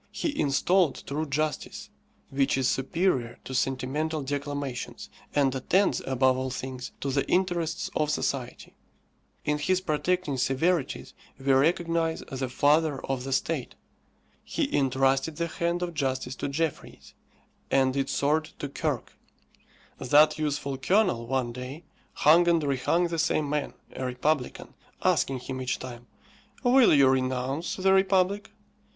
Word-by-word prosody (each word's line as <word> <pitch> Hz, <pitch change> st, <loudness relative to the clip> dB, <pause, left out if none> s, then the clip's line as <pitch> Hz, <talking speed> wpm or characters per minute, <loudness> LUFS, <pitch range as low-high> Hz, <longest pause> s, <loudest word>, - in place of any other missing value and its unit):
He 295 Hz, -, -2 dB
installed 160 Hz, +4 st, +2 dB
true 155 Hz, +3 st, -3 dB
justice, 150 Hz, +2 st, -3 dB, 0.4 s
which 135 Hz, 0 st, +1 dB
is 130 Hz, -1 st, +1 dB
superior 135 Hz, -3 st, 0 dB
to 130 Hz, -, -7 dB
sentimental 135 Hz, +5 st, -1 dB
declamations, 145 Hz, -2 st, -4 dB, 0.2 s
and 140 Hz, -3 st, +3 dB
attends, 185 Hz, +9 st, +1 dB
above 130 Hz, 0 st, +3 dB
all 130 Hz, 0 st, -2 dB
things, 130 Hz, 0 st, -6 dB
to 140 Hz, -, -1 dB
the 140 Hz, +1 st, +1 dB
interests 175 Hz, -2 st, 0 dB
of 150 Hz, -, +1 dB
society. 135 Hz, -4 st, -3 dB, 0.7 s
In 150 Hz, 0 st, 0 dB
his 185 Hz, +5 st, +1 dB
protecting 170 Hz, -2 st, -1 dB
severities 135 Hz, +5 st, 0 dB, 0.2 s
we 135 Hz, 0 st, +1 dB
recognize 165 Hz, +3 st, +1 dB
the 130 Hz, -1 st, -3 dB
father 145 Hz, +2 st, +2 dB
of 135 Hz, -1 st, -3 dB
the 135 Hz, -, -4 dB
state. 135 Hz, 0 st, -1 dB, 0.7 s
He -, -, -2 dB
entrusted 135 Hz, +2 st, +2 dB
the 170 Hz, -, -1 dB
hand 170 Hz, +1 st, -2 dB
of 175 Hz, -1 st, -3 dB
justice 130 Hz, -4 st, -2 dB
to -, -, -3 dB
Jeffreys, 155 Hz, +2 st, -4 dB, 0.6 s
and 130 Hz, -1 st, +2 dB
its 135 Hz, -1 st, -1 dB
sword 155 Hz, +2 st, +1 dB
to 145 Hz, -, -5 dB
Kirke. -, -, -3 dB, 0.9 s
That 150 Hz, +4 st, +4 dB
useful 145 Hz, -3 st, -2 dB
Colonel, 175 Hz, -, +2 dB
one 130 Hz, -2 st, -1 dB
day, 130 Hz, +6 st, -7 dB, 0.3 s
hung 170 Hz, +3 st, +5 dB
and 170 Hz, -2 st, +3 dB
rehung 145 Hz, +5 st, +1 dB
the 165 Hz, -1 st, -2 dB
same 155 Hz, -2 st, +1 dB
man, 150 Hz, 0 st, -2 dB, 0.2 s
a 130 Hz, -, -4 dB
republican, 125 Hz, +2 st, -2 dB, 0.3 s
asking 130 Hz, -2 st, +1 dB
him 130 Hz, 0 st, -5 dB
each 125 Hz, -1 st, -1 dB
time, 120 Hz, -1 st, -9 dB, 0.6 s
"Will 250 Hz, 0 st, +6 dB
you 140 Hz, -2 st, +6 dB
renounce 130 Hz, +4 st, 0 dB
the 190 Hz, 0 st, +3 dB
republic?" 195 Hz, +2 st, +2 dB
145 Hz, 135 wpm, -27 LUFS, 130-165 Hz, 0.9 s, Will